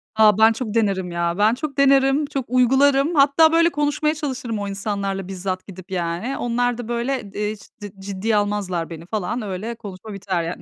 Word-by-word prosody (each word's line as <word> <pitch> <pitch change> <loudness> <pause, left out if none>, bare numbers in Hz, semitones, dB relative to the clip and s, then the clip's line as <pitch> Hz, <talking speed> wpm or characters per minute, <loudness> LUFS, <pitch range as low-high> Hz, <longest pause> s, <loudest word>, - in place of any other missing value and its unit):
A, 215 -2 +5
ben 220 +1 +6
çok 225 -2 -5
denerim 195 -5 0
ya. 170 +1 -1
Ben 215 +2 +4
çok 280 +2 -5
denerim, 275 +1 +4
çok 275 -3 -4
uygularım. 270 +5 +3
Hatta 290 +3 +5
böyle 335 +1 +4
konuşmaya 295 0 0
çalışırım 255 -7 -4
o 200 - -3
insanlarla 195 -1 -3
bizzat 185 0 -4
gidip 185 -1 -12
yani. 175 +8 -2
Onlar 245 0 0
da, 240 -2 -6
böyle, 240 +2 -1
eee, 210 +1 -2 0.3
cid 205 -1 -8
ciddiye 200 +3 -2
almazlar 200 -5 -1
beni 165 0 -9
falan. 215 +4 -3
Öyle 210 +3 -4
konuşma 205 -1 -9
biter 185 -3 -2
yani. 170 +2 -5
220 Hz, 180 wpm, -22 LUFS, 195-265 Hz, 0.3 s, ben